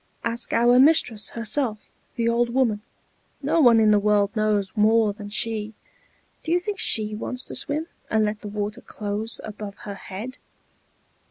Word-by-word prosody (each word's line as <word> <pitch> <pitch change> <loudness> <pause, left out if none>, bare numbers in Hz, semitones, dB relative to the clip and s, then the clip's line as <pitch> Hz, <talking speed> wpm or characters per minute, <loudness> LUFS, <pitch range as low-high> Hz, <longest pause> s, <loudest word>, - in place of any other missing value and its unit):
Ask 235 +1 -3
our 240 +2 +4
mistress 250 -8 +3
herself, 230 0 0 0.4
the 230 -1 0
old 235 +1 +2
woman; 235 -5 +1 0.6
no 330 - +2
one 240 -4 +6
in 215 -1 +5
the 210 - +5
world 205 0 +2
knows 210 -3 +1
more 215 0 +3
than 205 0 -9
she. 220 0 -2 0.7
Do 320 - -3
you 350 - +4
think 395 +2 -5
she 215 -1 +3
wants 250 +4 -4
to - - -7
swim, 300 +2 -1 0.2
and 220 -1 +2
let 210 +1 -3
the 210 - -7
water 205 0 -4
close 210 +2 -4
above 210 -1 -7
her 205 - -5
head?" 205 +6 -8
220 Hz, 165 wpm, -24 LUFS, 210-240 Hz, 0.7 s, one